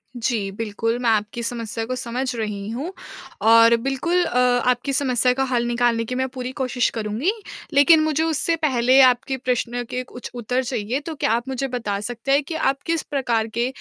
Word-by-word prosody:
जी 225 Hz, -4 st, -1 dB
बिल्कुल, 225 Hz, +2 st, -2 dB
मैं 240 Hz, -2 st, +1 dB
आपकी 215 Hz, +2 st, 0 dB
समस्या 230 Hz, -1 st, -3 dB
को 255 Hz, +2 st, -3 dB
समझ 250 Hz, +1 st, -3 dB
रही 210 Hz, -2 st, -4 dB
हूँ 270 Hz, +10 st, -4 dB, 0.6 s
और 230 Hz, +1 st, +7 dB
बिल्कुल 270 Hz, +9 st, 0 dB
अ, 250 Hz, -, -2 dB
आपकी 250 Hz, +2 st, +2 dB
समस्या 255 Hz, -2 st, +2 dB
का 270 Hz, +1 st, 0 dB
हल 240 Hz, -1 st, +1 dB
निकालने 235 Hz, -1 st, +1 dB
की 250 Hz, +3 st, -4 dB
मैं 260 Hz, 0 st, 0 dB
पूरी 255 Hz, -1 st, -5 dB
कोशिश 255 Hz, -2 st, +1 dB
करूँगी। 225 Hz, -, -1 dB, 0.4 s
लेकिन 310 Hz, +3 st, +6 dB
मुझे 310 Hz, 0 st, +1 dB
उससे 325 Hz, +1 st, +1 dB
पहले 260 Hz, -4 st, +3 dB
आपके 255 Hz, +1 st, +3 dB
प्रश्न 245 Hz, -1 st, -2 dB
के 250 Hz, 0 st, -3 dB
कुछ 245 Hz, -1 st, -10 dB
उत्तर 245 Hz, +2 st, -1 dB
चाहिए, 245 Hz, 0 st, -2 dB
तो 310 Hz, +2 st, -7 dB
क्या 225 Hz, -, 0 dB
आप 235 Hz, +2 st, 0 dB
मुझे 265 Hz, +1 st, -2 dB
बता 225 Hz, -6 st, -3 dB
सकते 240 Hz, +5 st, -4 dB
हैं 285 Hz, +2 st, +4 dB
कि 320 Hz, +3 st, -6 dB
आप 275 Hz, -3 st, 0 dB
किस 330 Hz, -1 st, 0 dB
प्रकार 240 Hz, -6 st, -1 dB
के 240 Hz, +1 st, +1 dB
250 Hz, 190 wpm, -22 LUFS, 230-270 Hz, 0.6 s, और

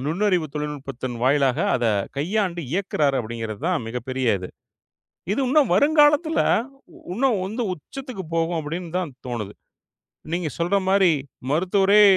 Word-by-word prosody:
நுண்ணறிவு 180 Hz, +1 st, +1 dB
தொழில்நுட்பத்தின் 135 Hz, -4 st, -4 dB
வாயிலாக 135 Hz, +1 st, +3 dB
அத 120 Hz, -, +1 dB, 0.3 s
கையாண்டு 175 Hz, +3 st, 0 dB
இயக்குறார் 155 Hz, -7 st, +1 dB
அப்படிங்கிறது 115 Hz, -1 st, -5 dB
தான் 175 Hz, -10 st, 0 dB
மிகப்பெரிய 125 Hz, +1 st, -2 dB
இது. 90 Hz, -, -7 dB, 0.8 s
இது 245 Hz, -, 0 dB
இன்னும் 300 Hz, +4 st, +5 dB
வருங்காலத்துல 295 Hz, -, +4 dB, 0.7 s
இன்னும் 255 Hz, +8 st, +2 dB, 0.2 s
உந்து 225 Hz, +5 st, -3 dB
உச்சத்துக்கு 255 Hz, -, -8 dB
போகும் 165 Hz, +1 st, +1 dB
அப்படின்னு 165 Hz, +3 st, -5 dB
தான் 175 Hz, -6 st, -2 dB
தோணுது. 110 Hz, -5 st, -4 dB, 0.8 s
நீங்க 170 Hz, -2 st, -1 dB
சொல்ற 175 Hz, +4 st, +1 dB
மாரி 190 Hz, -2 st, +5 dB, 0.4 s
மருத்துவரே 195 Hz, +6 st, +4 dB
170 Hz, 120 wpm, -23 LUFS, 135-200 Hz, 0.8 s, இன்னும்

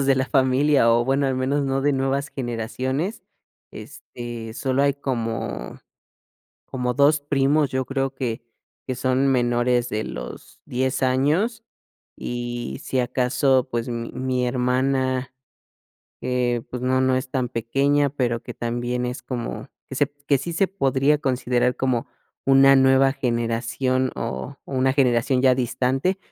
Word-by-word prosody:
miembros 135 Hz, -, 0 dB
de 135 Hz, -, +5 dB
la 130 Hz, 0 st, 0 dB
familia, 135 Hz, -1 st, +3 dB
o 120 Hz, +1 st, +3 dB
bueno, 135 Hz, +2 st, +1 dB
al 130 Hz, -, 0 dB
menos 135 Hz, +3 st, 0 dB
no 135 Hz, 0 st, 0 dB
de 145 Hz, +1 st, +2 dB
nuevas 135 Hz, +1 st, 0 dB
generaciones, 130 Hz, -, -3 dB, 0.5 s
este, 120 Hz, -2 st, -8 dB
solo 130 Hz, +2 st, 0 dB
hay 140 Hz, -1 st, +3 dB
como 120 Hz, -5 st, -4 dB, 0.9 s
como 125 Hz, -1 st, -1 dB
2 145 Hz, +3 st, +4 dB
primos, 145 Hz, +1 st, +2 dB
yo 130 Hz, 0 st, -1 dB
creo 135 Hz, 0 st, -2 dB
que 120 Hz, -4 st, -3 dB, 0.4 s
que 130 Hz, -, -2 dB
son 130 Hz, +2 st, +1 dB
menores 120 Hz, -1 st, +2 dB
de 110 Hz, +1 st, -2 dB
los -, -, -8 dB
10 130 Hz, +2 st, -1 dB
años, 150 Hz, -, +1 dB, 0.5 s
y 120 Hz, 0 st, -4 dB
si 130 Hz, -, 0 dB
acaso, 130 Hz, +1 st, +1 dB
pues, 120 Hz, 0 st, -2 dB
mi 115 Hz, -1 st, -4 dB
mi 130 Hz, -1 st, -1 dB
hermana 130 Hz, +1 st, 0 dB, 0.9 s
eh, 125 Hz, -2 st, 0 dB
pues, 125 Hz, -, -5 dB
no 130 Hz, +1 st, +2 dB
no 130 Hz, 0 st, +2 dB
es 130 Hz, 0 st, -2 dB
tan 130 Hz, -2 st, -1 dB
pequeña, 140 Hz, +5 st, +1 dB
pero, 120 Hz, -4 st, -1 dB
que -, -, -8 dB
también 120 Hz, +1 st, -2 dB
es 125 Hz, +1 st, -4 dB
como 120 Hz, +1 st, -5 dB, 0.2 s
que 135 Hz, -, -6 dB
se 145 Hz, +1 st, +2 dB, 0.2 s
que 140 Hz, -2 st, +4 dB
sí, 170 Hz, +6 st, -5 dB
se 195 Hz, +3 st, +2 dB
podría 140 Hz, -5 st, +2 dB
considerar 125 Hz, -2 st, +1 dB
como 130 Hz, -3 st, -1 dB, 0.4 s
una 135 Hz, 0 st, +7 dB
nueva 135 Hz, 0 st, +5 dB
generación 125 Hz, 0 st, -1 dB
o 125 Hz, +4 st, -5 dB
una 130 Hz, 0 st, +1 dB
generación 125 Hz, -1 st, +2 dB
ya 130 Hz, -1 st, +5 dB
distante, 130 Hz, -, 0 dB
130 Hz, 145 wpm, -23 LUFS, 125-135 Hz, 0.9 s, una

